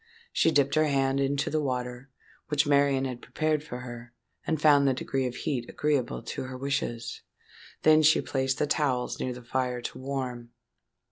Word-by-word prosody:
She -, -, +4 dB
dipped 140 Hz, -3 st, +2 dB
her 155 Hz, 0 st, +4 dB
hand 135 Hz, -1 st, +1 dB
into 140 Hz, +1 st, 0 dB
the 155 Hz, 0 st, +1 dB
water, 125 Hz, -1 st, -3 dB, 0.4 s
which 150 Hz, +1 st, +2 dB
Marian 140 Hz, -2 st, +3 dB
had 125 Hz, -2 st, -5 dB
prepared 155 Hz, -1 st, -1 dB
for 125 Hz, -4 st, -7 dB
her, 120 Hz, -1 st, -9 dB, 0.3 s
and 160 Hz, -2 st, 0 dB
found 145 Hz, -2 st, +5 dB
the 135 Hz, -, +2 dB
degree 130 Hz, 0 st, -1 dB
of 125 Hz, -, -6 dB
heat 125 Hz, -5 st, -3 dB
agreeable 145 Hz, -5 st, -1 dB
to -, -, -5 dB
her 130 Hz, 0 st, -7 dB
wishes. 135 Hz, -3 st, -3 dB, 0.6 s
Then 155 Hz, 0 st, +6 dB
she 155 Hz, 0 st, +5 dB
placed 130 Hz, -1 st, -1 dB
the -, -, +1 dB
towels 140 Hz, -4 st, 0 dB
near 130 Hz, -, -2 dB
the 125 Hz, 0 st, -8 dB
fire 125 Hz, 0 st, -1 dB
to 120 Hz, -, -6 dB
warm. 130 Hz, -3 st, -4 dB
135 Hz, 180 wpm, -28 LUFS, 125-145 Hz, 0.6 s, Then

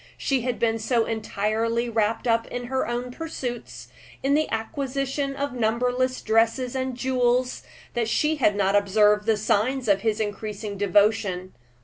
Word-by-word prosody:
She 270 Hz, -3 st, 0 dB
had 245 Hz, 0 st, -2 dB
been 225 Hz, -1 st, +1 dB
so 230 Hz, +1 st, +1 dB
entirely 225 Hz, +2 st, -1 dB
wrapped 225 Hz, 0 st, 0 dB
up 230 Hz, -1 st, +2 dB
in 245 Hz, -, -5 dB
her 260 Hz, +1 st, -1 dB
own 240 Hz, +1 st, -3 dB
pursuits, 255 Hz, -5 st, -6 dB, 0.4 s
in 275 Hz, +1 st, +2 dB
the 310 Hz, +1 st, +2 dB
acquisition 275 Hz, +3 st, -2 dB
of 280 Hz, -1 st, -3 dB
numberless 250 Hz, +2 st, 0 dB
dresses 230 Hz, +3 st, +2 dB
and 260 Hz, -1 st, -2 dB
jewels, 250 Hz, 0 st, +1 dB, 0.3 s
that 230 Hz, -2 st, 0 dB
she 305 Hz, +5 st, +1 dB
had 210 Hz, -7 st, +3 dB
not 200 Hz, 0 st, +2 dB
observed 210 Hz, +1 st, +3 dB
the 220 Hz, -1 st, +3 dB
signs 225 Hz, +5 st, 0 dB
of 200 Hz, -1 st, +3 dB
his 220 Hz, -1 st, 0 dB
increasing 210 Hz, -1 st, -4 dB
devotion. 200 Hz, -1 st, +1 dB
230 Hz, 150 wpm, -25 LUFS, 215-255 Hz, 0.4 s, had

